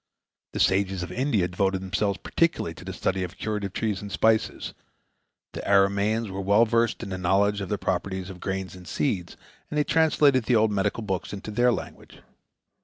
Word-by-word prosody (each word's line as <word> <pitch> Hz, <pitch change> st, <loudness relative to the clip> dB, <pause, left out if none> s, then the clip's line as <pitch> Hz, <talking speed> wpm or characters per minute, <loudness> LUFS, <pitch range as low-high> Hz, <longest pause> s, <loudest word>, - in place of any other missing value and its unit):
The -, -, -3 dB
sages 95 Hz, -1 st, +2 dB
of 90 Hz, -, -6 dB
India 115 Hz, -5 st, +1 dB
devoted 95 Hz, +1 st, 0 dB
themselves 100 Hz, +2 st, 0 dB
particularly 165 Hz, -, 0 dB
to -, -, -12 dB
the -, -, -6 dB
study 95 Hz, 0 st, -1 dB
of 90 Hz, +1 st, -5 dB
curative 105 Hz, -3 st, -3 dB
trees 105 Hz, -2 st, -2 dB
and 100 Hz, -1 st, -7 dB
spices; 110 Hz, +2 st, +1 dB, 0.8 s
the -, -, -5 dB
Arameans 100 Hz, +2 st, +2 dB
were 95 Hz, +1 st, -4 dB
well 100 Hz, +4 st, +4 dB
versed 115 Hz, +1 st, +1 dB
in 100 Hz, -, -6 dB
the 95 Hz, -1 st, -4 dB
knowledge 100 Hz, +3 st, +2 dB
of 95 Hz, -, -5 dB
the 105 Hz, -, 0 dB
properties 95 Hz, 0 st, -2 dB
of 90 Hz, -, -11 dB
grains 95 Hz, -1 st, -4 dB
and 90 Hz, -1 st, -12 dB
seeds, 95 Hz, -11 st, -2 dB, 0.3 s
and 150 Hz, -, -3 dB
they 150 Hz, -, +4 dB
translated 145 Hz, -6 st, +3 dB
the 125 Hz, -, +3 dB
old 110 Hz, -1 st, +4 dB
medical 105 Hz, +3 st, -1 dB
books 95 Hz, -2 st, -3 dB
into 100 Hz, +2 st, -6 dB
their 120 Hz, +3 st, +3 dB
language. -, -, -6 dB
100 Hz, 185 wpm, -26 LUFS, 95-110 Hz, 0.8 s, well